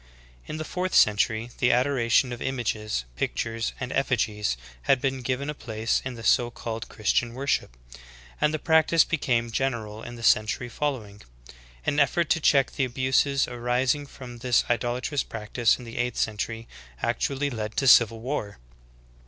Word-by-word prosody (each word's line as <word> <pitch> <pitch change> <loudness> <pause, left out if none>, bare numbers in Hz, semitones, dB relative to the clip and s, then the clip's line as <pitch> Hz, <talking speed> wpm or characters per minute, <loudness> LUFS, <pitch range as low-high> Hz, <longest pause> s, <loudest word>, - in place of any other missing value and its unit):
( - - -27
7. - - -7
In - - -4
the 155 - -4
fourth 185 +3 -2
century 110 +2 +3
the 125 - +4
adoration 125 -1 +2
of 120 - -8
images, 110 - -2
pic - - -2
tures, 115 0 -2
and 130 0 -4
effigies, 110 - 0 0.3
had 135 - +5
been 135 0 -1
given 130 +3 -2
a 150 - -2
place 110 -5 -2
in 130 -1 -5
the 115 - -9
so 120 +1 +3
called 115 -1 -6
Christian 115 +2 0
worship; 135 - -1 0.6
and 150 - +3
the 155 - -1
practice 160 +1 +4
became 120 -7 0
general 110 -4 -2
in 120 +1 -8
the 115 - -10
century 115 +3 +2
following. 115 -8 -4 0.6
An 145 - +1
effort 160 +3 +2
to 165 - +3
check 135 -3 +4
the 135 - -1
abuses 130 +2 +1
arising 125 +4 0
from 125 -3 -10
this 125 0 +2
idolatrous 125 +4 -1
practice 110 +1 0
in 125 - -11
the 115 +1 -7
eighth 120 -1 -1
century, 115 +1 -2 0.4
actually 140 +1 -1
led 110 -3 -5
to 135 - +1
civil 115 -2 +6
war.' 115 -6 -4
120 Hz, 170 wpm, -26 LUFS, 115-135 Hz, 0.6 s, civil